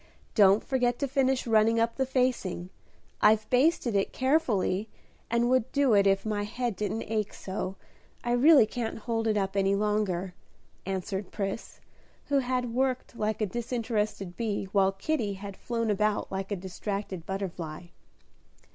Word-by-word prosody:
Don't 200 -1 +5
forget 245 -3 +1
to 280 - -1
finish 265 -1 +1
running 225 0 +4
up 230 0 +1
the 265 -1 0
facing; 245 -9 -1 0.5
I've 215 0 +4
basted 255 -3 +3
it 195 - +1
carefully, 230 -8 +1 0.4
and 235 +1 +2
would 255 -1 +2
do 280 -4 +3
it 200 -1 +5
if 195 +1 +2
my 210 -1 -1
head 235 +2 -2
didn't 210 +3 -2
ache 215 -2 -2
so, 190 0 -4 0.5
I 240 - -1
really 270 +1 +7
can't 230 0 -4
hold 225 0 -2
it 215 -1 +2
up 195 -1 -1
any 195 0 +2
longer," 200 -3 0 0.5
answered 190 +1 -3
Pris, 195 +1 -4 0.5
who 285 -1 +3
had 250 -2 -1
worked 255 0 -1
like 215 -1 -2
a - - +3
disinterested 220 -4 -2
bee, 220 -3 -2
while 195 -1 +3
Kitty 210 +1 -1
had 200 0 -8
flown 230 0 -2
about 210 +1 0
like 195 +1 -4
a - - +1
distracted 190 -1 -5
butterfly. 180 -4 -5
215 Hz, 155 wpm, -28 LUFS, 195-245 Hz, 0.5 s, really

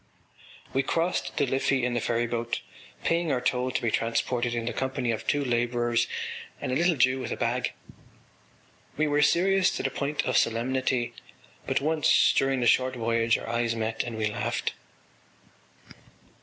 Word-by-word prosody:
We 135 - +3
crossed 165 +6 -1
the - - +3
Liffey 135 0 +1
in 125 - -1
the 120 - +1
ferryboat, 120 0 -1 0.4
paying 165 -1 +1
our 130 - +1
toll 125 0 0
to 130 - -2
be 115 - +1
transported 120 +2 0
in 115 -1 -2
the 120 - -2
company 130 -2 -1
of 110 - -4
two 145 -1 +1
labourers 120 -1 +1 0.5
and - - -3
a - - 0
little 170 +3 +3
Jew 130 0 +3
with 130 - -5
a - - -2
bag. - - -1 1.2
We 155 - +2
were 145 0 +2
serious 190 +5 +4
to - - -3
the - - 0
point 145 +1 -2
of - - +1
solemnity, 120 +1 0 0.5
but - - +1
once 155 +1 +4
during 135 -1 +2
the - - +1
short 130 +2 +3
voyage 115 -1 +1
our - - -8
eyes 115 0 0
met 110 0 -1
and 115 -2 -5
we 110 - 0
laughed. 105 - -2
125 Hz, 170 wpm, -27 LUFS, 115-135 Hz, 1.2 s, serious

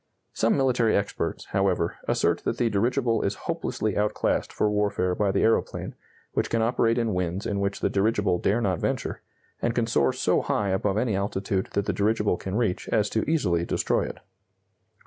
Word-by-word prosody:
Some 115 - +2
military 125 -4 +2
experts, 100 0 -3
however, 95 -4 +1
assert - - +2
that - - -1
the 115 -2 +1
dirigible 115 +3 +1
is 100 0 -1
hopelessly 105 -2 -2
outclassed 105 +1 0
for - - +1
warfare 100 -3 +1
by 100 +2 +1
the 95 - +1
aeroplane, 115 - 0 0.4
which - - 0
can 115 -1 +1
operate 115 0 +2
in 115 -3 0
winds 90 +2 -2
in 100 -1 -1
which 100 0 -2
the - - +2
dirigible 100 -3 +1
dare 110 +4 +1
not 95 -6 0
venture, - - -2 0.4
and 120 0 0
can 120 - +2
soar 75 - +2
so - - +1
high 100 -1 0
above 95 +1 0
any 110 -2 +1
altitude 100 +1 -1
that 100 - 0
the - - 0
dirigible 105 -2 +1
can 95 +1 -5
reach 110 -6 -1
as 105 -1 +1
to 110 - +1
easily 90 - +1
destroy - - 0
it. - - -6
105 Hz, 185 wpm, -26 LUFS, 95-115 Hz, 0.4 s, Some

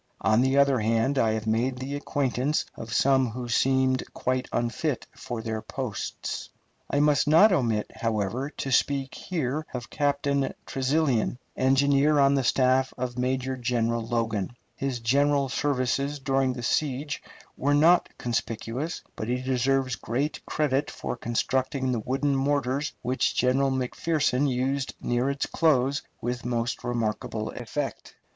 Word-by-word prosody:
On 110 +2 +4
the 130 +1 +2
other 140 -2 +4
hand, 115 +5 +1
I 110 -3 +3
have 110 0 -3
made 120 +4 0
the 130 +2 -5
acquaintance 145 0 0
of 115 0 -8
some 130 0 +3
who 120 +2 -5
seemed 130 +2 +2
quite 130 0 -1
unfit 120 +4 -1
for 120 -2 -5
their 110 -1 -3
places. 130 -4 -5 0.4
I 140 - +1
must 150 0 +3
not 165 +8 +7
omit, 115 - +1
however, 115 +4 -1
to 135 -3 -5
speak 135 0 +1
here 155 -4 -2
of 120 0 -6
Captain 140 -1 0
Tresilian, 135 -3 +1 0.2
engineer 140 +3 +3
on 140 0 +5
the 135 -1 +2
staff 130 +1 +2
of 125 -1 -3
Major 130 +1 0
General 115 -2 0
Logan. 115 -2 -2 0.2
His 135 -3 -2
general 140 +3 +2
services 140 +1 0
during 135 -1 +1
the 120 -1 -7
siege 145 +3 -1 0.3
were 145 +2 +1
not 170 +4 +5
conspicuous, 120 +6 -3
but 110 - -4
he 125 +1 0
deserves 130 0 +1
great 135 +7 -2
credit 145 -1 0
for - - -4
constructing 130 +3 -1
the 120 - 0
wooden 135 +5 0
mortars 140 +1 0
which 125 +1 0
General 135 +2 +2
McPherson 135 +1 0
used 135 +2 -1
near 120 +2 0
its 140 0 -1
close 140 -4 +2 0.2
with 120 +1 -3
most 120 0 -2
remarkable 110 -2 -2
effect. - - -5
130 Hz, 140 wpm, -26 LUFS, 120-140 Hz, 0.4 s, not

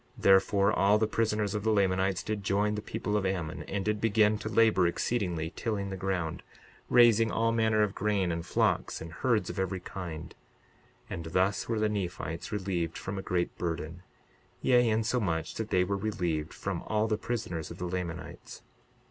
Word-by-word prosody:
62:29 - - -12
Therefore, 100 +1 +5
all 100 +2 +4
the 110 - +2
prisoners 105 -2 0
of 105 - -1
the 110 - +1
Lamanites 95 -2 +2
did 105 -2 -3
join 100 +2 +1
the 105 - -3
people 105 0 -3
of 105 - +1
Ammon, 90 -5 -2
and 100 -1 -3
did 105 0 0
begin 110 -1 +3
to 110 - -4
labor 110 -6 +4
exceedingly, 85 -4 -1
tilling 100 -4 -2
the - - -3
ground, 90 -4 -2 0.5
raising 115 -2 +6
all 115 +1 +1
manner 110 -2 +3
of 100 -2 -1
grain, 100 -3 0
and 85 0 -3
flocks - - 0
and 80 +1 -8
herds 110 -7 0
of 90 - -6
every 95 0 -1
kind; 85 -3 -7 0.7
and 85 - -6
thus 95 +7 0
were 115 - 0
the 110 0 +2
Nephites 90 -5 -4
relieved 90 -5 -2
from 95 0 -4
a - - -3
great 90 -2 -1
burden; 85 0 -3 0.6
yea, 125 -2 +4
insomuch 110 -7 0
that 110 -1 -4
they 90 -4 +3
were 100 +2 -1
relieved 90 -7 -2
from - - -4
all 110 0 +1
the 110 - +1
prisoners 105 -8 -4
of 85 - -8
the 90 - -4
Lamanites. 85 -2 -6
100 Hz, 180 wpm, -30 LUFS, 90-110 Hz, 0.7 s, raising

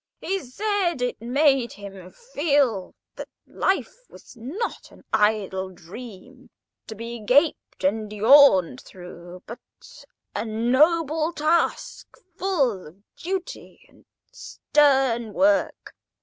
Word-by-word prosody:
He 390 +1 -2
said 365 - -2
it 245 - -3
made 265 0 +1
him 195 -2 -11 0.2
feel 280 - +1 0.2
that - - -8 0.2
life 385 +4 -2
was - - -16
not 285 - -6
an - - -19
idle 200 -3 0
dream 230 +8 -13 0.4
to 220 - -8
be 230 +2 -7
gaped 260 - +1
and 210 +2 -1
yawned 215 - +5
through, 180 0 -12
but 235 - -9 0.8
a - - -2
noble 305 +8 +1
task, 320 +2 -1 0.2
full 280 - -1
of 185 +6 -18
duty 375 +7 -6
and - - -24 0.3
stern 270 - +1
work. 295 +4 +1
250 Hz, 105 wpm, -23 LUFS, 205-305 Hz, 0.8 s, yawned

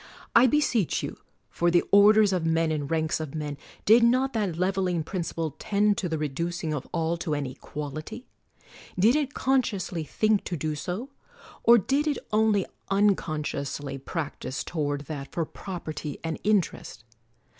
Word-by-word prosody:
I 240 +2 +8
beseech 245 - +1
you, - - -5 0.3
for 175 - +1
the 175 0 +4
orders 205 0 +6
of 180 -3 0
men 165 0 +2
and 145 -3 -2
ranks 160 -1 0
of 155 -2 -5
men, 150 -2 -3 0.3
did 225 +3 +7
not 255 +3 +3
that 200 -7 -1
leveling 185 -2 0
principle 165 -3 -3
tend 205 0 +2
to 180 - -2
the 160 - -1
reducing 160 +2 -2
of 145 -3 -4
all 165 0 0
to 160 -3 -2
an 145 -1 -2
equality? 150 - -7 0.7
Did 220 +8 +5
it 290 -2 -1
con 265 0 +3
sciously 190 -8 -4
think 215 +7 +1
to 175 - -3
do 155 +1 -2
so; 185 - -5 0.5
or 235 +1 +7
did 275 +8 +1
it 290 -3 +1 0.2
only 215 -3 +3 0.2
uncon 195 -6 +2
sciously 140 -1 -4
practise 140 -5 -4
toward 145 -3 -2
that 145 -2 -7
for 165 - -1
property 155 -5 -6
and 165 -1 -3
interest? 195 - 0
175 Hz, 160 wpm, -27 LUFS, 155-210 Hz, 0.7 s, I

